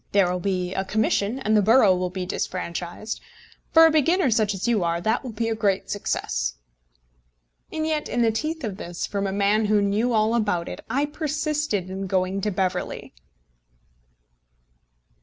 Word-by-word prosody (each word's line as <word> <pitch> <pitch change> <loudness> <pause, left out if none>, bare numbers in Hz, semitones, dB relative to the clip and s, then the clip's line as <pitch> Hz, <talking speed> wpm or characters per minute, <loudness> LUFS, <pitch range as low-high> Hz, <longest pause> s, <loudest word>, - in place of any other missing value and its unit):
There 195 -3 +4
will 180 - -1
be 180 -1 -1
a 190 - -1
commission, 215 +2 0
and 220 -5 +1
the 210 - +5
borough 215 -2 +5
will 180 0 -1
be 185 0 -4
disfranchised. 180 +3 -4 0.5
For 325 0 +8
a 325 - +5
beginner 315 0 +3
such 215 -2 +2
as 195 - -3
you 225 -6 +2
are, 170 0 0
that 220 +6 0
will 255 - -5
be 225 +1 -2
a 225 - 0
great 205 -3 0
success." - - -2 1.2
And 315 0 -2
yet, 310 -1 -1
in 240 - +1
the 225 - +3
teeth 310 +7 -3
of 205 -5 -4
this, 175 -1 -4
from 200 -1 -2
a - - -2
man 205 +2 +2
who 210 0 +3
knew 205 +4 +1
all 220 0 +2
about 205 -7 0
it, - - -7
I 275 +5 +1
persisted 300 - -2
in 195 0 -4
going 185 +1 0
to 210 - 0
Beverley! 185 - -2
205 Hz, 175 wpm, -24 LUFS, 185-235 Hz, 1.2 s, For